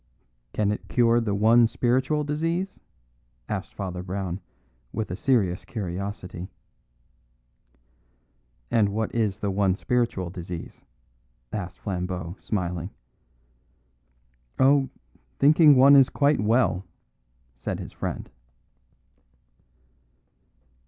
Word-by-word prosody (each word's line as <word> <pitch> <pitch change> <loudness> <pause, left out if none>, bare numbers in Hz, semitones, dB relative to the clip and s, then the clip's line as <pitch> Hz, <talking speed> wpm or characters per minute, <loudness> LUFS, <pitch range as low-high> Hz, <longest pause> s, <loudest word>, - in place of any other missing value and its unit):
"Can 105 -1 +1
it 105 - -5
cure 120 -1 +3
the 105 -3 -1
one 115 +3 +5
spiritual 130 +6 +1
disease?" 165 +6 -2 0.7
asked - - -4
Father 90 -2 -4
Brown, 95 0 -4 0.5
with 110 -5 -3
a - - -2
serious 105 -6 +1
curiosity. 95 -4 -5 2.2
"And 105 -3 +3
what 110 +2 -2
is 110 -4 0
the 100 - 0
one 95 -1 +2
spiritual 115 -6 -1
disease?" 90 -1 -8 0.7
asked 95 -4 -4
Flambeau, 90 -3 -4
smiling. 90 -3 -3 1.7
"Oh, 135 0 +4 0.5
thinking 150 +1 +6
one 135 +2 +8
is 135 -2 +7
quite 145 0 +2
well," 105 -4 +2 0.7
said 65 - -4
his - - -8
friend. - - -4
105 Hz, 95 wpm, -25 LUFS, 90-130 Hz, 2.2 s, one